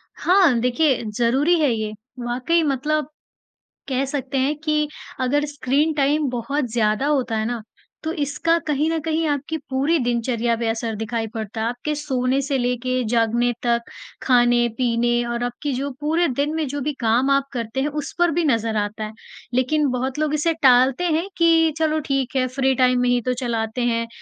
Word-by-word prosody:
हाँ 350 -9 +4
देखिए 250 +2 +1
ज़रूरी 270 +9 +3
है 300 -3 +3
ये। 215 -1 -3 0.3
वाक़ई 250 +8 0
मतलब 295 +1 0 0.8
कह 265 +1 0
सकते 270 0 -3
हैं 270 +3 +1
कि 305 -1 0 0.3
अगर 290 +4 +1
स्क्रीन 290 +2 0
टाइम 290 0 +1
बहुत 265 +4 -2
ज़्यादा 215 +2 +1
होता 260 -6 0
है 220 - -1
ना 240 -1 -3 0.4
तो 320 - -2
इसका 325 +1 0
कहीं 300 +1 +1
ना 325 - 0
कहीं 320 +1 -1
आपकी 290 +2 -2
पूरी 275 +5 +1
दिनचर्या 235 -1 0
पे 230 0 -2
असर 225 0 -2
दिखाई 225 +1 -3
पड़ता 220 -1 -5
है। 225 - 0
आपके 245 +5 -3
सोने 265 -3 0
से 275 0 -1
लेके 250 0 -1
जागने 235 +1 +2
तक 235 -1 +2 0.4
खाने-पीने 240 -1 +2
और 235 0 -2
आपकी 245 +4 -3
जो 275 +3 -2
पूरे 325 +4 +2
दिन 285 +3 -1
में 315 -2 -1
जो 285 +2 -4
भी 295 +3 -1
काम 240 +3 +2
आप 275 0 +2
करते 235 +1 -3
हैं 285 - 0
उस - - -7
पर 350 -1 +4
भी 340 +3 0
नज़र 230 -4 +1
आता 210 +1 -2
है। 215 0 -6 0.4
लेकिन 280 +4 +2
बहुत 255 +3 -2
लोग 305 -1 0
इसे 305 +2 +1
टालते 255 +4 +5
हैं 330 +4 0
कि 330 -1 +4
चलो 315 -1 +1
ठीक 270 -1 -1
है 255 -1 +2
फ्री 265 +1 +1
टाइम 250 0 +3
में 250 - +2
ही 245 0 +2
तो 250 +2 -1
चलाते 230 0 -2
हैं 230 -1 0
260 Hz, 185 wpm, -22 LUFS, 240-295 Hz, 0.8 s, टालते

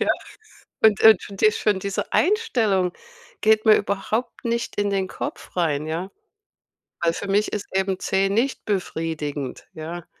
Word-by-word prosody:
Ja, - - +1 0.8
und 215 -3 +6
und 220 -4 +8
schon 200 - -9
die 215 +1 +5
schon 210 -3 +1
diese 200 0 -3
Einstellung 230 - +2 0.5
geht 220 0 +4
mir 215 - +8
überhaupt 215 +4 -2
nicht 235 0 -1
in 205 0 +1
den 195 -1 0
Kopf - - -7
rein, 155 -3 0
ja, 170 +5 -3 0.9
weil 170 -1 +3
für 200 - -5
mich 205 +2 +2
ist 205 -1 -3
eben 190 -1 0
C 195 0 +1
nicht 235 +7 0
befriedigend, 160 -8 -3
ja? 165 +2 -7
195 Hz, 155 wpm, -23 LUFS, 175-215 Hz, 0.9 s, und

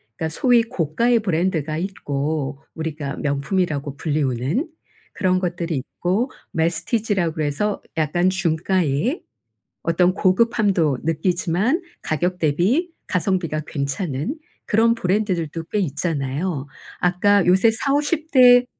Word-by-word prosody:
그러니까 160 -1 -2
소위 240 +7 +3
고가의 230 - +1
브랜드가 165 -5 0
있고 145 -5 -3
우리가 155 -3 -4
명품이라고 145 -1 -1
불리우는 150 - -1 0.4
그런 185 -2 +1
것들이 170 -2 -2
있고 185 - -1 0.2
Messtige 170 +7 0
라고 170 -4 0
그래서 155 +7 -1 0.2
약간 175 +4 +2
중가의 180 - 0 0.6
어떤 180 +2 +3
고급함도 190 - +2
느끼지만 180 - +1 0.2
가격 175 +3 -1
대비 195 - +1 0.2
가성비가 180 -4 0
괜찮은 140 - -2 0.3
그런 230 +2 +3
브랜드들도 180 -6 -1
꽤 210 - -2
있잖아요. 145 -2 -2 0.3
아까 190 +2 +3
요새 190 +5 +5
40-50 290 +6 0
대 245 -2 +7
175 Hz, 285 characters per minute, -22 LUFS, 155-205 Hz, 0.6 s, 대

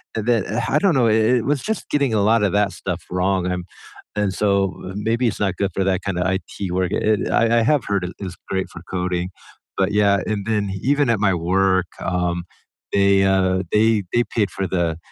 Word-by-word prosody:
and 110 -1 -2
then 115 -5 +2
uh, 110 - -1
I 150 - +3
don't 185 -5 +2
know, 120 -3 +3
it 110 +3 +3
it - - -7
was 140 -1 0
just 220 -1 -3
getting 140 -5 +1
a 105 - +2
lot 110 +1 +3
of 100 - +1
that 105 -1 +2
stuff 90 0 -5
wrong, 90 0 0
um, 90 -1 -3 0.5
and 105 -2 0
so 100 -2 +1 0.2
maybe 115 +4 0
it's - - -2
not 95 -3 0
good 100 -1 0
for 95 - +1
that 95 -1 0
kind 95 -3 -2
of - - 0
IT 95 0 -3
work. 90 -1 0
It 105 -1 +1
I 115 0 +3
I - - +2
have 140 -1 +2
heard 100 -2 0
it 90 - -6
is 95 -3 -6
great 95 -1 -1
for 85 - -11
coding, 90 -1 -2 0.5
but 95 +1 +1
yeah, 100 -1 +3
and 105 -2 -2
then 105 -3 0
even 140 -1 +2
at 110 -4 +2
my 95 -3 +3
work, 95 +1 +1
um, 90 -1 -1 0.5
they, 100 -1 +4
uh, 95 -1 +2
they 110 -1 +3
they 120 - +3
paid 105 -3 +2
for 95 -1 -3
the 85 -3 -1
100 Hz, 220 wpm, -21 LUFS, 95-110 Hz, 0.5 s, they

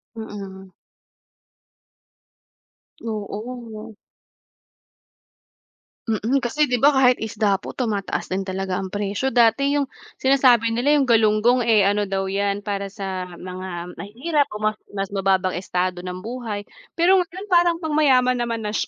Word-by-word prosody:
Mm. 195 -3 -8 2.3
Oo. 220 +1 -6 2.1
Mm, 225 +4 0
kasi 295 +5 +1
di 245 - +2
ba, 285 +4 +5
kahit 255 -2 +4
isda 210 -2 0
po - - -8
tumataas 215 -6 -2
din 195 +1 -1
talaga 190 -1 -3
ang 190 0 -5
presyo. 205 +5 -2
Dati 245 +4 +3
yung 280 -2 0 0.3
sinasabi 255 -4 +4
nila 250 +6 +2
yung 280 -3 +2
galunggong 225 +2 +4
eh, 215 -4 +4
ano 205 0 +1
daw 195 0 -2
yan, 200 +1 -1
para 200 -1 -3
sa 195 -2 -5
mga 180 -1 -7
mahihirap 280 +8 -1
o 210 - -6
mas 215 0 0 0.2
mas 195 -1 -3
mababang 190 -2 +1
estado 180 0 -2
ng 180 0 -5
buhay, 225 -3 -5 0.3
pero 355 +3 +5
ngayon 360 +3 -5
parang 345 -1 +4
pang 315 - -3
mayaman 255 -4 +4
naman 230 -1 -2
na 210 - -2
siya, - - -1
220 Hz, 135 wpm, -22 LUFS, 195-255 Hz, 2.3 s, ba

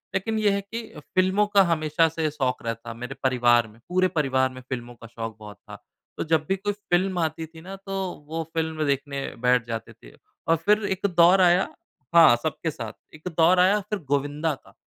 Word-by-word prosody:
लेकिन 220 +3 -1
ये 210 -1 +3
है 200 0 0
कि 225 +3 -7 0.3
फ़िल्मों 190 +3 +3
का 205 -1 +5
हमेशा 155 +1 +2
से 160 0 -1
शौक 130 -4 -2
रहता 115 0 -4
मेरे 125 +3 -7
परिवार 120 -3 +3
में। 110 +1 -18
पूरे 185 +1 +3
परिवार 130 -2 +2
में 130 - -10
फ़िल्मों 120 -1 -5
का 115 0 -13
शौक 115 -1 -7
बहुत 105 -1 -11
था। - - -13 0.3
तो - - -1
जब 160 -1 +2
भी 195 - +3
कोई 205 +2 -2
फ़िल्म 185 -2 0
आती 160 0 -2
थी 160 0 -14
ना, 190 +3 -8
तो 195 0 -9 0.3
वो 165 +1 -3
फ़िल्म 160 -1 -1
देखने 140 0 -2 0.2
बैठ 125 -1 +3
जाते 115 -1 -5
थे - - -17 0.4
और 165 - +4
फिर 210 +1 +4
एक 190 0 -2
दौर 175 +3 +6
आया 180 +1 +4 0.5
हाँ 165 -7 +8
सबके 160 +1 -2
साथ। 115 -6 -7 0.2
एक 155 +3 -10
दौर 175 +3 +5
आया 190 +3 +4
फिर 210 -2 -2
गोविंदा 145 +3 0
का। - - -19
160 Hz, 200 wpm, -25 LUFS, 130-185 Hz, 0.5 s, हाँ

